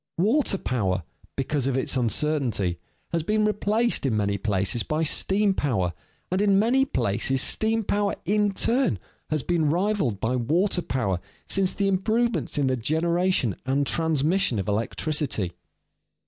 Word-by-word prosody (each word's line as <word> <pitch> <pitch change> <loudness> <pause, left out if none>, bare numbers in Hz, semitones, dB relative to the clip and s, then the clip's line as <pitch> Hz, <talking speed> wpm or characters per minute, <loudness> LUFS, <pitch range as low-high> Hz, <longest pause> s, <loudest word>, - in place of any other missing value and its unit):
Water 215 - +2
power, 95 - -1 0.3
because 135 0 -1
of 135 -1 0
its 130 - 0
uncertainty, 120 - 0 0.3
has 170 - 0
been 215 +6 +1
replaced 215 +3 +1
in 125 -6 +1
many 100 -1 0
places 100 +2 0
by 155 +6 -1
steam 195 +6 +2
power, 110 - -1 0.4
and 185 +2 +1
in 200 -1 +4
many 245 +6 +3
places 130 - 0
steam 220 +10 +1
power 205 0 0
in 205 +2 +2
turn, 230 - +1 0.3
has 155 -4 0
been 165 -4 +1
rivaled 175 - 0
by 115 +5 0
water 170 - +1
power 100 - -1 0.3
since 195 -2 +1
the 200 - 0
improvements 220 +4 0
in 145 - +2
the 130 0 +1
generation 160 - +1
and 135 +2 0
transmission 160 - +1
of 95 - -3
electricity. 115 - -1
155 Hz, 145 wpm, -25 LUFS, 120-200 Hz, 0.4 s, in